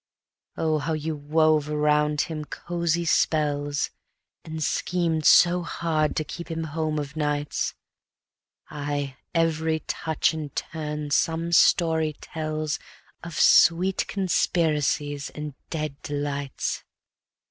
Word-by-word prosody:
Oh, 155 -1 +1
how 155 +2 -2
you 155 0 -2
wove 155 0 +2
around 150 0 +2
him 155 -2 -4
cozy 170 +1 -2
spells, 145 -3 +1 0.5
And 160 -1 -4
schemed 165 -2 0
so 175 0 +6
hard 160 -3 -1
to 155 - 0
keep 170 +3 -8
him 165 0 -3
home 155 0 -2
of 145 0 -4
nights! 150 -1 -1 1.0
Aye, 145 -2 -3 0.2
every 160 -1 +1
touch 160 0 0
and 155 -3 -6
turn 150 -2 -4
some 165 +3 +1
story 160 -2 +4
tells 155 -1 -3 0.4
Of 170 -2 -5
sweet 180 +3 +5
conspiracies 150 -6 0
and 150 -1 -5 0.2
dead 155 -3 -4
delights. 145 -1 -3
155 Hz, 110 wpm, -25 LUFS, 150-165 Hz, 1.0 s, so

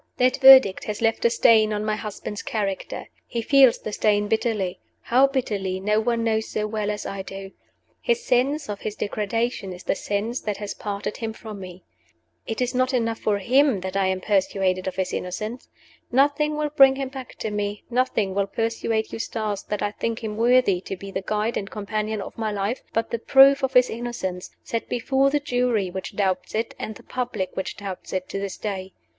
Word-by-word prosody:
That 255 +1 +3
verdict 265 -7 +8
has 210 -1 -4
left 225 0 +1
a - - +7
stain 220 -2 +5
on 210 0 -2
my 215 0 0
husband's 210 -1 -6
character. 200 -3 -3 0.2
He 235 -2 -3
feels 265 -1 +6
the 215 - -6
stain 205 -1 +2
bitterly. 210 -4 -1 0.2
How 260 +3 +4
bitterly 205 -9 -2
no 210 +3 +2
one 230 +1 0
knows 220 -1 0
so 210 - -2
well 215 -1 -2
as 210 0 -3
I 195 0 -4
do. 195 0 -8 0.5
His 475 -1 0
sense 275 +4 +1
of 205 -1 -5
his 215 - -4
degradation 210 0 -2
is 180 0 -9
the - - +1
sense 210 +5 -2
that 210 -2 -3
has 205 -1 -5
parted 205 0 -4
him 225 -1 -4
from 215 -2 -9
me. 185 -1 -10 0.6
It 225 +2 -3
is 250 +1 0
not 255 +1 +1
enough 230 -2 0
for 210 -2 +1
him 250 +1 +3
that 190 +1 -5
I 195 -1 +2
am 190 0 -1
persuaded 190 -2 +1
of 190 - -3
his 190 -1 -2
innocence. 215 +7 -4 0.4
Nothing 290 +4 +2
will 300 0 0
bring 270 -2 +7
him 270 -1 -3
back 265 -1 -9
to 220 - -4
me 205 0 -3
nothing 235 -6 +1
will 200 0 0
persuade 225 +1 -1
Eustace 215 -3 -3
that 210 - -4
I 205 - 0
think 230 +2 -3
him 215 -1 -3
worthy 230 -5 +3
to 190 - -6
be 195 +2 -8
the 190 - -3
guide 215 +3 -1
and 195 - -4
companion 215 0 -3
of - - -10
my 220 -1 -1
life 205 +4 -2
but 225 0 -1
the 235 - -1
proof 275 +3 +6
of 265 -1 -1
his 250 0 +6
innocence, 225 -6 -4
set 230 -1 -4
before 265 +3 +2
the 295 +1 +1
Jury 245 -8 0
which 190 0 -6
doubts 190 -2 -1
it, 225 +1 -1
and 215 - -5
the - - -14
public 240 -7 -3
which 190 - -4
doubts 195 -2 -7
it, 185 -1 -2
to 195 - -3
this 195 -1 -4
day. 190 -3 -5
215 Hz, 205 wpm, -24 LUFS, 200-245 Hz, 0.6 s, verdict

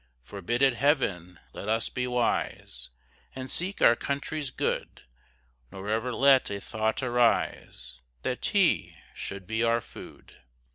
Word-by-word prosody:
Forbid 100 - -2
it 135 -2 +5
Heaven, 100 - 0
let 105 - -6
us 115 +1 +1
be 125 0 -2
wise, 125 - -2 0.5
And 130 0 -6
seek 185 +3 -1
our 115 - +7
country's 140 +2 -3
good; - - -3 0.7
Nor 95 +2 -7
ever 115 +3 0
let 135 +1 +5
a 100 - -3
thought 110 +4 -2
arise 120 - 0 0.2
That - - -2
tea - - +2 0.2
should 100 -1 -6
be 110 +2 -1
our 115 0 +3
food. - - -13
115 Hz, 135 wpm, -28 LUFS, 100-130 Hz, 0.7 s, our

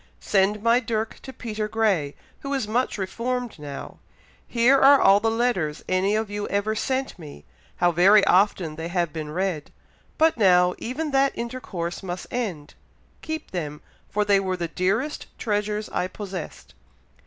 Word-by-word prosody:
Send 205 +1 +1
my 235 +1 +4
dirk 225 -2 -3
to 265 - -9
Peter 215 -4 -4
Grey, 205 -10 0 0.2
who 275 - -6
is 260 -6 -2
much 240 +3 0
reformed 235 +3 -3
now. 145 -2 -8 0.5
Here 250 +3 +4
are 275 +1 +7
all 195 +1 +6
the 225 +2 +1
letters 225 -10 -1
any 190 +3 +1
of 220 0 0
you 205 0 -4
ever 205 +2 0
sent 260 +1 -2
me; 145 - -11 0.3
how 175 - +3
very 195 +5 +6
often 180 -5 +2
they 160 +1 -4
have 175 -3 -1
been 155 -2 -5
read! 175 -2 -2 0.5
but 320 -3 +3
now, 180 -4 +5
even 290 +6 -3
that 275 0 +3
intercourse 215 -8 -4
must 180 -1 -5
end; 185 -12 -4 0.5
keep 315 0 -5
them, 150 -5 -4 0.3
for 210 0 0
they 200 -1 +4
were 185 -1 -2
the 170 -1 -2
dearest 200 - -1
treasures 210 -1 -1
I 180 - -1
possessed. 185 - -8
205 Hz, 160 wpm, -24 LUFS, 180-235 Hz, 0.5 s, are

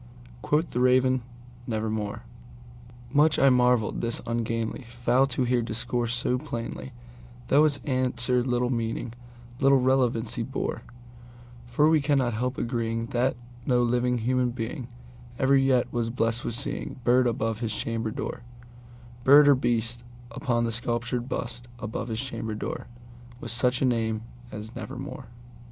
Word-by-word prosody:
Quoth 155 +3 +1
the 125 - -1
Raven, 130 0 +4 0.5
"Nevermore."Much 120 +5 -2
I 135 - +6
marvelled 125 -3 +2
this 115 0 -1
ungainly 115 0 -2
fowl 120 +2 +2
to 130 -1 0
hear 125 0 +2
discourse 115 +1 -1
so 125 +1 0
plainly, 120 +2 -6 0.6
Though 150 +3 +6
its 145 -2 +1
answer 125 -2 +1
little 125 0 0
meaning—little 120 +3 -1
relevancy 125 -3 +1
bore; 130 +4 -3 0.9
For 135 +5 +3
we 160 -1 +4
cannot 135 -4 +1
help 125 +4 -2
agreeing 115 -1 -1
that 125 +2 +2 0.3
no 125 -1 +3
living 125 +1 +1
human 125 +1 +1
beingEver 120 +2 -2
yet 130 -2 +2
was 120 -1 0
blessed 115 0 -1
with 115 - -1
seeing 140 0 -2
bird 125 +1 +4
above 115 -2 -1
his 115 -3 -1
chamber 115 -1 -2
door, 110 - -5 0.8
Bird 145 +3 +8
or 145 - +8
beast 120 -2 -1 0.3
upon 120 -1 0
the 115 - 0
sculptured 120 +1 -2
bust 120 -1 -4
above 110 0 -4
his 110 -2 -3
chamber 115 -4 -4
door, 110 - -5 0.5
With 115 - -5
such 125 +3 +2
name 110 -3 0 0.3
as 105 +2 -8
"Nevermore." 130 -1 -7
120 Hz, 135 wpm, -26 LUFS, 115-130 Hz, 0.9 s, Bird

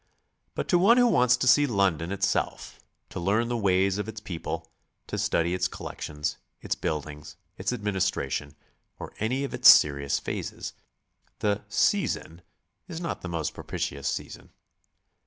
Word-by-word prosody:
But - - -3
to 175 - +4
one 220 +7 +6
who 245 - +6
wants 125 - +4
to 130 - -1
see 145 +4 +6
London 95 - +1
itself, 100 0 -2 0.3
to - - -6
learn 105 +7 +1
the 120 - -1
ways 95 -2 +2
of 105 - -3
its 110 0 -7
people, 90 -6 -5 0.4
to - - -5
study 85 +1 +1
its 90 - +1
collections, 75 0 -5 0.2
its - - -2
buildings, 75 -1 -5 0.2
its - - -2
administration, 95 -9 -2 0.4
or - - -8
any 125 +6 0
of 140 - -4
its - - +7
serious 70 -1 +5
phases, - - -5 0.6
the 105 -1 0
"season" 105 - 0 0.5
is 165 -3 -6
not 170 -1 -4
the 90 - -6
most 80 -3 -2
propitious 70 0 -4
season. - - -5
100 Hz, 150 wpm, -27 LUFS, 80-125 Hz, 0.6 s, its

